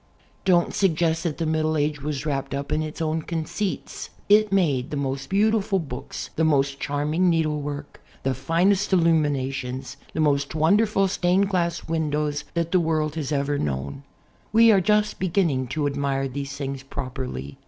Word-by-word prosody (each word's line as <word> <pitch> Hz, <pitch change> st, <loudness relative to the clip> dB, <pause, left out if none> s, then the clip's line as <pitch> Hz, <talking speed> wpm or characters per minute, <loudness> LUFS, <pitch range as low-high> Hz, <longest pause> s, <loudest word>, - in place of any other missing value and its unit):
Don't 175 Hz, -2 st, +3 dB
suggest 165 Hz, -3 st, +1 dB
that 160 Hz, -3 st, -2 dB
the 165 Hz, -, -1 dB
Middle 155 Hz, 0 st, +1 dB
Age 150 Hz, 0 st, 0 dB
was 145 Hz, 0 st, -3 dB
wrapped 140 Hz, -2 st, -2 dB
up 140 Hz, 0 st, -4 dB
in 155 Hz, -, +1 dB
its 155 Hz, +1 st, -4 dB
own 160 Hz, 0 st, 0 dB
conceits. 170 Hz, +5 st, -4 dB, 0.2 s
It 210 Hz, 0 st, +5 dB
made 145 Hz, -10 st, +1 dB
the 150 Hz, -, -3 dB
most 135 Hz, 0 st, -3 dB
beautiful 205 Hz, 0 st, +2 dB
books, 140 Hz, -8 st, -6 dB
the 160 Hz, -, +2 dB
most 140 Hz, -3 st, +2 dB
charming 150 Hz, +5 st, +1 dB
needlework, 150 Hz, -3 st, -2 dB, 0.2 s
the 135 Hz, -, +1 dB
finest 175 Hz, -, +1 dB
illuminations, 140 Hz, -6 st, 0 dB, 0.2 s
the -, -, -3 dB
most 145 Hz, -1 st, +1 dB
wonderful 195 Hz, +5 st, +3 dB
stained 190 Hz, +1 st, +2 dB
glass 175 Hz, -3 st, -1 dB
windows 150 Hz, -2 st, -1 dB
that 170 Hz, 0 st, -1 dB
the 185 Hz, -, +4 dB
world 155 Hz, -2 st, 0 dB
has 155 Hz, -3 st, -4 dB
ever 140 Hz, 0 st, 0 dB
known. 70 Hz, 0 st, -3 dB, 0.5 s
We 230 Hz, +1 st, +7 dB
are 195 Hz, -3 st, +5 dB
just 210 Hz, +2 st, +1 dB
beginning 165 Hz, -8 st, +1 dB
to 145 Hz, +4 st, -2 dB
admire 140 Hz, -1 st, -1 dB
these 140 Hz, +1 st, -5 dB
things 135 Hz, -1 st, -4 dB
properly. 130 Hz, -, -6 dB
155 Hz, 160 wpm, -24 LUFS, 140-175 Hz, 0.5 s, We